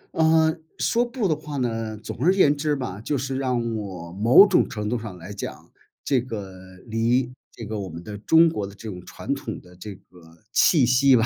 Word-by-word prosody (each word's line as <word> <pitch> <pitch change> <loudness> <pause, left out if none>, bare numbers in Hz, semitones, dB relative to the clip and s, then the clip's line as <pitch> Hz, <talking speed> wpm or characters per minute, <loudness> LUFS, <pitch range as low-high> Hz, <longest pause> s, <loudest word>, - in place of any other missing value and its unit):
嗯， 160 0 +3 0.2
说 235 - +2
不 240 -3 -2
的 155 - +1
话 150 -1 -7
呢， 115 -4 -2
总 110 - -7
而 170 +6 +5
言 150 -7 +4
之 150 0 0
吧， 110 -8 -5
就 145 +5 -1
是 135 +1 -3
让 125 -3 0 0.2
我 95 -5 -6
某 115 - +7
种 195 - +3
程 105 -1 -4
度 120 +3 0
上 105 -5 -8
来 90 +4 -9
讲， 100 - -7 0.4
这 130 -4 +2
个 105 -6 -7 0.3
离 120 +2 0 0.2
这 115 - -9
个 110 0 -4
我 95 -2 -5
们 85 +1 -9
的 105 +1 -7
中 160 +10 +5
国 105 -12 -2
的 100 - -12
这 110 - -10
种 90 -4 -7
传 - - -4
统 - - -6
的 90 0 -18
这 100 +3 -8
个 85 -3 -19
气 145 +1 +4
息 130 +2 +5
吧， 115 -1 +3
115 Hz, 230 characters per minute, -24 LUFS, 105-145 Hz, 0.4 s, 某